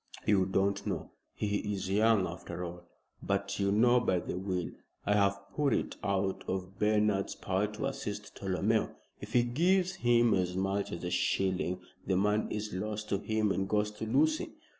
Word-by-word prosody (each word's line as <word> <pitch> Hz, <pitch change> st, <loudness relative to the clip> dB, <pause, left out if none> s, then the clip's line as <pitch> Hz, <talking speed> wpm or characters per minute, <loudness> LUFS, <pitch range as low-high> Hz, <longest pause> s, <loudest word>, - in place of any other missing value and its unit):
"You 95 Hz, -3 st, +3 dB
don't 100 Hz, +1 st, +1 dB
know. -, -, -3 dB, 0.2 s
He 105 Hz, -1 st, 0 dB, 0.2 s
is 95 Hz, -1 st, -3 dB
young 105 Hz, 0 st, +4 dB
after 85 Hz, 0 st, -6 dB
all. 85 Hz, 0 st, -9 dB, 0.3 s
But 100 Hz, +1 st, -1 dB
you 100 Hz, 0 st, +2 dB
know, 120 Hz, +4 st, +5 dB
by 95 Hz, -6 st, +1 dB
the 85 Hz, -, -3 dB
will, 90 Hz, -2 st, -2 dB, 0.3 s
I 105 Hz, -, +3 dB
have 100 Hz, -1 st, +3 dB
put 145 Hz, -2 st, +2 dB
it -, -, -2 dB
out 95 Hz, -1 st, 0 dB
of 95 Hz, 0 st, -4 dB
Bernard's 105 Hz, -2 st, +2 dB
power 95 Hz, +2 st, 0 dB
to 105 Hz, +5 st, -4 dB
assist 105 Hz, -7 st, -5 dB
Tolomeo. 100 Hz, +3 st, 0 dB, 0.2 s
If 105 Hz, +2 st, -9 dB
he 120 Hz, -, +5 dB
gives 180 Hz, +9 st, +2 dB
him 120 Hz, -1 st, +4 dB
as 90 Hz, -1 st, 0 dB
much 95 Hz, +1 st, -1 dB
as 85 Hz, -, -5 dB
a 90 Hz, -, -2 dB
shilling 95 Hz, -1 st, 0 dB, 0.3 s
the 95 Hz, -1 st, +2 dB
money 105 Hz, +3 st, +1 dB
is 105 Hz, -1 st, -4 dB
lost 105 Hz, +3 st, -3 dB
to 100 Hz, -, +1 dB
him 110 Hz, -1 st, 0 dB
and 95 Hz, 0 st, -1 dB
goes 105 Hz, 0 st, +1 dB
to 110 Hz, +1 st, -6 dB
Lucy." 315 Hz, -, +1 dB
100 Hz, 180 wpm, -31 LUFS, 95-110 Hz, 0.3 s, know